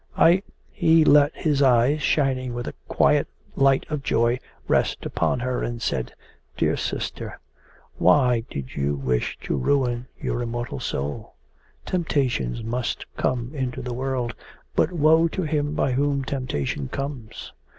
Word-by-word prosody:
I...' 175 +3 +6 0.3
He 165 -3 +4
let 145 0 +6
his 145 -3 +1
eyes, 130 +3 +4
shining 130 -3 +1
with 120 0 -4
a - - -4
quiet - - +3 0.3
light 135 -1 +3
of 150 -2 -3
joy, 120 -1 +1 0.3
rest - - +1
upon - - 0
her, 125 0 -1
and 120 0 -3
said: - - -2 0.5
'Dear - - +2
sister, - - -4 0.6
why 120 +6 +4
did 65 -2 -6
you 70 0 0
wish 65 -3 -1
to - - -2
ruin 125 - +1
your 120 - -2
immortal 120 - -4
soul? 70 +3 -4 0.5
Temptations 130 - -1
must 120 +2 -2
come 125 0 -1
into 130 -4 -3
the 125 0 -4
world, 125 -2 -2 0.4
but 165 - +3
woe 160 0 +4
to 185 +3 -3
him 150 -1 -1
by 140 - +1
whom 140 +1 +1
temptation 120 - -2
comes. 135 - -6
130 Hz, 140 wpm, -24 LUFS, 120-145 Hz, 0.6 s, I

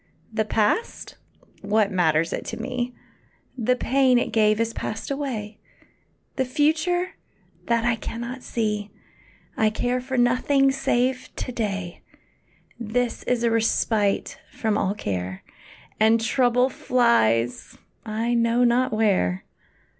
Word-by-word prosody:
The 220 -1 0
past 215 - -1 0.5
what 210 0 +1
matters 165 -3 +2
it - - -3
to - - -5
me? 250 0 -3 0.6
The 250 0 +1
pain 260 0 +3
it 240 - -1
gave 215 -1 +3
has 230 0 -1
passed 220 +5 -5
away. 235 -7 -4 0.8
The 265 - +2
future 315 +7 +1 0.6
that 235 -1 +1
I 235 -1 +2
cannot 235 +3 -6
see! 210 -4 -2 0.7
I 220 - +3
care 245 +3 -1
for 260 +1 -4
nothing 270 +3 +3
save 255 -1 0
to - - -4
day 195 -6 -4 0.8
This 240 +2 -1
is 245 -1 0
a 235 - +2
respite 220 -2 +1
from 220 -2 -1
all 200 -1 0
care, 95 - -4 0.6
And 220 +1 +5
trouble 250 +2 +2
flies 125 - +1 0.3
I 225 +2 -2
know 235 +1 +2
not 245 +1 +3
where. 195 - +1
230 Hz, 125 wpm, -24 LUFS, 210-250 Hz, 0.8 s, And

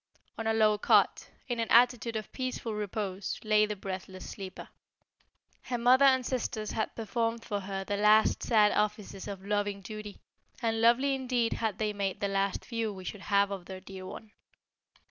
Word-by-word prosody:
On 225 - -4
a 225 - +2
low 215 -1 +4
cot, - - +3 0.2
in 240 -2 -2
an 230 - -1
attitude 235 -1 +4
of 215 -1 -4
peaceful 255 -3 -3
repose, 205 -2 -3
lay 215 -1 +4
the 210 - -3
breathless 190 -1 -7
sleeper. 190 -1 -8 0.9
Her 245 - -3
mother 250 +3 +5
and 260 -2 +4
sisters 220 -4 -2
had 220 - -2
performed 230 +1 -2
for 205 -2 -2
her 195 0 -4
the 205 +1 -2
last 210 +1 +4
sad 215 -3 +4
offices 210 -2 -2
of 195 -1 -7
loving 205 -1 -1
duty, 215 0 -8 0.4
and 225 -2 0
lovely 245 +4 +4
indeed 250 -3 0
had 220 -3 -2
they 215 -1 -1
made 195 -2 -2
the 200 - 0
last 195 0 -1
view 230 -3 -2
we 190 -2 -9
should 195 +2 -6
have 200 0 +2
of 190 -3 -5
their 190 -1 -7
dear 185 0 -9
one. 215 +2 -9
210 Hz, 180 wpm, -30 LUFS, 200-230 Hz, 0.9 s, mother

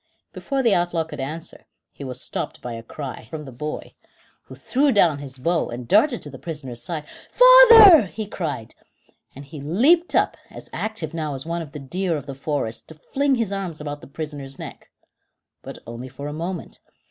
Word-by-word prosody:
Before 275 -2 -2
the 230 -4 +4
outlaw 175 -2 +1
could 160 - -10
answer; 155 +5 -7 0.2
he - - -10
was 130 -2 -5
stopped - - -5
by 120 - -6
a 115 - -6
cry: 130 0 -8
from 150 -2 -7
the 135 - -9
boy, 150 +5 -6 0.5
who - - -12
threw 280 +2 +1
down 170 - +3
his 135 -2 -8
bow 165 +6 0
and 120 0 -7
darted 235 - +3
to 145 - -8
the 135 - -10
prisoner's 135 -8 -5
side. 155 -4 -5 0.2
"Father!" 460 - +9
he 215 +4 -6
cried; 155 - -5 0.6
and 140 +2 -10
he 140 +1 -10
leaped 265 - +3
up, - - +2
as - - -12
active 215 -9 -4
now 155 -3 -3
as 135 - -7
one 170 +1 -3
of 155 -3 -9
the 150 - -8
deer 170 +5 -2
of 145 - -8
the 140 - -6
forest, 135 -5 -3
to 160 - -10
fling 275 - 0
his 225 -5 -1
arms 185 -5 -4
about 145 -1 -6
the - - -12
prisoner's 140 -2 -7
neck. - - -10 0.7
But - - -9
only 120 +2 -8
for 140 +3 -8
a 150 - -5
moment. 170 +3 -5
155 Hz, 195 wpm, -23 LUFS, 140-195 Hz, 0.7 s, Father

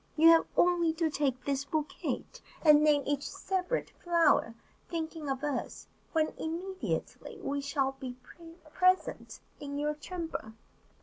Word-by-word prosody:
You 325 +2 +8
have 330 0 +6
only 345 -2 +4
to 320 -1 0
take 270 -4 -1
this 275 -1 0
bouquet, 305 +1 -2 0.4
and 300 -2 +7
name 295 -2 +4
each 285 -1 0
separate 380 +5 -2
flower, 335 -9 +3 0.3
thinking 320 -3 -4
of 270 +1 -2
us, 290 -3 -3 0.3
when 315 -1 +2
immediately 375 +6 -4
we 285 -6 -2
shall 275 -1 0
be 260 -2 -8 0.6
present 370 0 +1 0.2
in 285 0 -5
your 300 +1 0
chamber." 320 -7 -6
305 Hz, 130 wpm, -31 LUFS, 280-340 Hz, 0.6 s, You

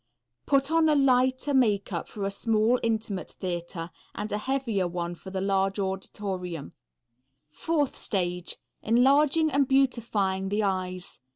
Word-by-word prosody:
Put 275 +1 +2
on 325 -1 +4
a 300 - +4
lighter 260 0 +3
makeup 205 -8 +1
for 200 -2 -5
a 200 - -1
small, 225 +3 +2
intimate 220 -4 -2
theatre, 175 -2 -5 0.2
and 210 +1 -4
a 210 - 0
heavier 230 -6 0
one 175 0 -3
for 175 +2 -10
the 190 0 -3
large 195 0 +1
auditorium. 190 -4 -4 0.8
Fourth 295 - -1
stage. 180 -3 -1 0.2
Enlarging 280 +7 +4
and 275 0 +2
beautifying 220 -8 +1
the 210 +2 0
eyes. 185 -2 -3
205 Hz, 130 wpm, -27 LUFS, 190-260 Hz, 0.8 s, on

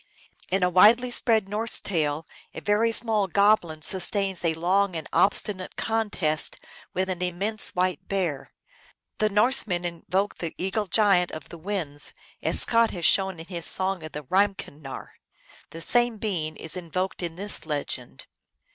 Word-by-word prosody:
In 190 0 +1
a 180 - +3
widely 230 +7 +5
spread 220 -4 +2
Norse 215 +3 +1
tale 155 -4 -2 0.3
a - - -4
very 210 +3 +1
small 220 -3 0
goblin 190 -5 +2
sustains 190 0 +1
a 165 -1 +1
long 185 +3 +1
and 160 -2 -5
obstinate 195 -1 +1
contest 210 -9 -1 0.4
with 185 +1 0
an 185 -2 -4
immense 195 +5 0
white 180 -3 -1
bear. 175 -8 -2 0.7
The 215 - +2
Norsemen 210 -4 +1
invoked 180 +4 -2
the 170 -2 -5
Eagle 195 +3 -1
Giant 190 -2 +4
of 155 -2 -9
the 170 - -9
Winds, 160 -6 -3 0.3
as - - +4
Scott 230 -1 +3
has 175 -3 -4
shown 190 +2 +2
in 165 - -8
his 170 -3 -1
song 190 -1 0
of 155 -1 -9
the 150 - -6
Reim 195 +7 +2
kennar. 145 -6 -10 0.5
The 165 - -9
same 240 +5 +3
being 170 -8 -3
is 160 +2 -3
invoked 185 +2 -3
in 170 -2 -4
this 195 -3 +1
legend. 145 - -4
185 Hz, 155 wpm, -25 LUFS, 165-205 Hz, 0.7 s, widely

